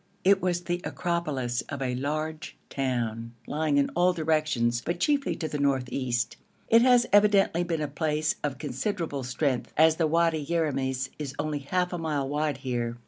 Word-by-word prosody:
It 195 +1 +4
was 175 -1 0
the 175 0 -2
acropolis 150 -9 -2
of 140 - -4
a 130 -2 -1
large 155 +4 -3
town, 115 -3 -2
lying 150 -1 0
in 140 - +2
all 180 +1 +3
directions, 155 -8 +1
but 170 +1 -2
chiefly 280 +6 +1
to 160 - -3
the 150 -1 -4
north 135 -3 +1
east. 120 -3 -1 0.3
It 230 +1 +7
has 245 -1 +5
evidently 200 -4 +4
been 165 -3 -2
a - - -1
place 155 +1 0
of 145 -3 -2
considerable 145 - -3
strength, 125 +1 -1
as 160 +1 +5
the 165 - +2
Wadi 165 -1 +2
Yeramis 135 -5 -1
is 140 -2 -5
only 150 0 -2
half 180 +6 -1
a 175 - -3
mile 150 -4 -1
wide 150 0 -1
here. 120 -3 -3
150 Hz, 175 wpm, -27 LUFS, 135-170 Hz, 0.3 s, It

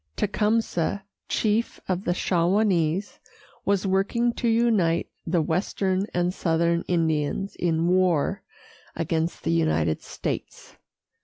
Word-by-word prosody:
Tecumseh, 210 -3 0 0.3
chief 220 +2 0
of 185 +1 -2
the 175 - +2
Shawanese, 180 0 +1 0.5
was 200 0 +1
working 200 +5 +1
to 235 - -2
unite 225 -8 +2 0.2
the 165 -1 +2
western 185 +4 0
and 175 0 0
southern 170 -1 +1
Indians 165 +2 0
in 165 -1 +1
war 185 0 +2 0.5
against 165 0 -2
the 80 - 0
United 80 -1 +1
States. - - -6
180 Hz, 105 wpm, -25 LUFS, 165-200 Hz, 0.5 s, the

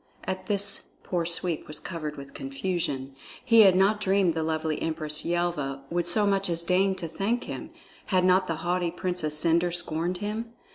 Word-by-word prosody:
At 185 0 -4
this 200 -1 +1
poor 170 -2 -1
Sweep 170 -1 +2
was 150 - -4
covered 155 -4 -5
with 140 0 -10
confusion. 135 -1 -3 0.3
He 230 -2 +6
had 190 -3 +7
not 200 +3 +3
dreamed 195 -3 +3
the 160 - -2
lovely 155 -1 -1
Empress 155 -1 -2
Yelva 170 -6 -1
would 175 0 0
so 205 +4 +3
much 195 -1 +1
as 170 0 0
deign 190 +2 +2
to 180 -3 -5
thank 200 +9 -1
him; - - -6 0.4
had 185 -2 +2
not 185 0 +4
the 165 - -1
haughty 175 0 +1
Princess 175 -3 -3
Cendre 170 +2 +3
scorned 175 +1 -2
him? 220 +4 -4
175 Hz, 180 wpm, -27 LUFS, 160-190 Hz, 0.4 s, had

